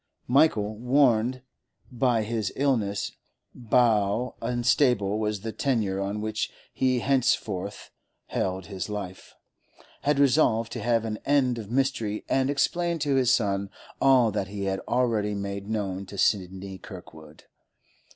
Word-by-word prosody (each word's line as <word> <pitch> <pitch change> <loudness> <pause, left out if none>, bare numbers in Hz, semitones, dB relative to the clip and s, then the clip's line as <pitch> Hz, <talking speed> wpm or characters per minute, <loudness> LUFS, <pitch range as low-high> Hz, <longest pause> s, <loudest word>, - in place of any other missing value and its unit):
Michael, 115 -6 +3
warned 125 -1 +2 0.5
by 120 -2 +1
his 110 -2 -2
illness 110 -8 0 0.6
how 115 -1 +3
unstable 120 -4 +2
was 105 -2 -2
the 110 +1 -4
tenure 110 -5 0
on 100 +2 -3
which 110 0 -2 0.2
he 130 -2 +1
henceforth 110 -7 0 0.3
held 95 0 -2
his 95 0 -5
life, 100 -3 -7 0.7
had 145 0 +1
resolved 125 -5 +3
to - - -5
have 115 -1 +1
an 110 -1 -4
end 130 -4 +2
of 105 -3 -8
mystery 120 -5 -1
and 135 0 +1
explain 170 +4 0
to 145 -2 0
his 130 -2 +3
son 100 -4 +1 0.3
all 130 -4 +5
that 100 -2 -2
he 100 0 -5
had 95 0 -1
already 115 -4 +1
made 100 0 -5
known 100 -3 -3
to 100 - -9
Sidney 95 -1 -1
Kirkwood. 80 -5 -12
110 Hz, 130 wpm, -26 LUFS, 100-125 Hz, 0.7 s, all